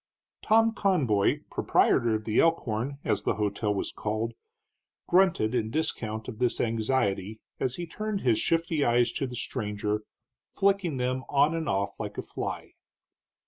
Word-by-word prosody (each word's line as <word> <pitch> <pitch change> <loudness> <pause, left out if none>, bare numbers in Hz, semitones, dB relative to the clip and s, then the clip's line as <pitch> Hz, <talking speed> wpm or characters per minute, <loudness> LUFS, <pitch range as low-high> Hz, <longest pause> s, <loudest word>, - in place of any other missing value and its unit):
Tom 225 +1 +4
Conboy, 140 - +2
proprietor 115 -2 +3
of 110 - -3
the 110 0 +1
Elkhorn, 140 -5 +1
as - - 0
the - - 0
hotel 105 +1 -1
was 100 - -2
called, 110 +2 -3 0.7
grunted 175 - +3
in 110 -3 0
discount 110 -7 -2
of 115 -3 -7
this 125 -1 +1
anxiety 110 -3 0 0.2
as 130 -1 -1
he 175 - -4
turned 215 +4 -4
his 120 -4 +2
shifty 165 -3 +1
eyes 120 -1 +3
to 135 - -2
the 125 - -7
stranger, 105 -3 -2 0.5
flicking 195 -7 +1
them 130 +1 -1
on 145 +3 +3
and 165 -2 -2
off 100 +1 -1
like - - -5
a - - -3
fly. - - -5
125 Hz, 150 wpm, -28 LUFS, 110-160 Hz, 0.7 s, Tom